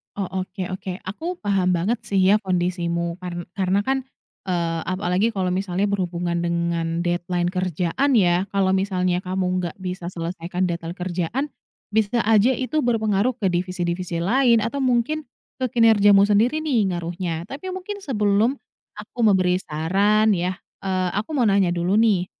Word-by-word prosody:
Oh, 195 Hz, -2 st, -2 dB, 0.2 s
oke 185 Hz, -1 st, -6 dB
oke, 185 Hz, 0 st, -5 dB
aku 320 Hz, -, -4 dB
paham 190 Hz, -3 st, +1 dB
banget 205 Hz, +8 st, 0 dB
sih 195 Hz, -1 st, +1 dB
ya 210 Hz, -, +5 dB
kondisimu. 175 Hz, -2 st, -1 dB
Karn 175 Hz, -1 st, -5 dB
karena 190 Hz, 0 st, +1 dB
kan, 270 Hz, +4 st, +1 dB, 0.5 s
eee, 170 Hz, -2 st, -1 dB
apalagi 185 Hz, +4 st, 0 dB
kalau 185 Hz, -2 st, 0 dB
misalnya 185 Hz, 0 st, -1 dB
berhubungan 175 Hz, -3 st, -1 dB
dengan 170 Hz, -1 st, -1 dB
deadline 175 Hz, 0 st, -1 dB
kerjaan 185 Hz, -, 0 dB
ya. 180 Hz, -2 st, +3 dB
Kalau 195 Hz, -1 st, +2 dB
misalnya 185 Hz, -2 st, +1 dB
kamu 185 Hz, 0 st, -2 dB, 0.2 s
nggak 175 Hz, -2 st, -4 dB
bisa 180 Hz, -1 st, -5 dB
selesaikan 175 Hz, +1 st, -4 dB
deadline 170 Hz, 0 st, -4 dB
kerjaan, 180 Hz, +7 st, -2 dB, 0.5 s
bisa 220 Hz, +2 st, +1 dB
aja 220 Hz, +3 st, +4 dB
itu 285 Hz, +4 st, -1 dB
berpengaruh 220 Hz, 0 st, +1 dB
ke 195 Hz, -6 st, 0 dB
divisi-divisi 175 Hz, -1 st, -2 dB
lain, 235 Hz, +1 st, +3 dB
atau 255 Hz, +5 st, -2 dB
mungkin, 260 Hz, +4 st, 0 dB, 0.3 s
ke 260 Hz, -, -1 dB
kinerjamu 205 Hz, -4 st, +6 dB
sendiri 225 Hz, +9 st, +2 dB
nih, 260 Hz, -9 st, +1 dB
ngaruhnya. 170 Hz, -1 st, -3 dB
Tapi 365 Hz, +7 st, -6 dB
mungkin 380 Hz, +2 st, -6 dB
sebelum 220 Hz, -, +1 dB, 0.4 s
aku -, -, -11 dB
memberi 185 Hz, -3 st, +3 dB
saran 200 Hz, +8 st, +2 dB
ya, 180 Hz, 0 st, -1 dB, 0.3 s
eee, 185 Hz, -1 st, 0 dB
aku 210 Hz, +10 st, -3 dB
mau 245 Hz, -4 st, +3 dB
nanya 195 Hz, -3 st, +3 dB
dulu 175 Hz, +2 st, 0 dB
nih. 210 Hz, -6 st, +3 dB
190 Hz, 150 wpm, -23 LUFS, 175-220 Hz, 0.5 s, kinerjamu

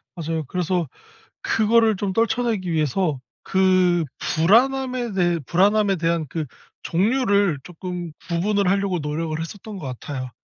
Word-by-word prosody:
맞아요. 165 Hz, -2 st, -3 dB
그래서 175 Hz, +1 st, -1 dB, 0.6 s
그거를 225 Hz, 0 st, +3 dB
좀 190 Hz, 0 st, -2 dB
떨쳐내기 225 Hz, -3 st, 0 dB
위해서 155 Hz, -1 st, 0 dB, 0.2 s
그 185 Hz, -2 st, +3 dB
불안함에 245 Hz, +6 st, +2 dB
대해 175 Hz, -2 st, +1 dB
불안함에 200 Hz, +2 st, +3 dB
대한 165 Hz, -1 st, 0 dB
그 160 Hz, +4 st, -3 dB, 0.4 s
종류를 200 Hz, -, +2 dB
조금 180 Hz, -1 st, -6 dB, 0.2 s
구분을 195 Hz, +3 st, +1 dB
하려고 195 Hz, -1 st, +1 dB
노력을 155 Hz, +1 st, -3 dB
했었던 200 Hz, +5 st, -7 dB
것 150 Hz, -, -7 dB
같아요. 130 Hz, -3 st, -6 dB
185 Hz, 300 characters per minute, -22 LUFS, 165-210 Hz, 0.6 s, 그거를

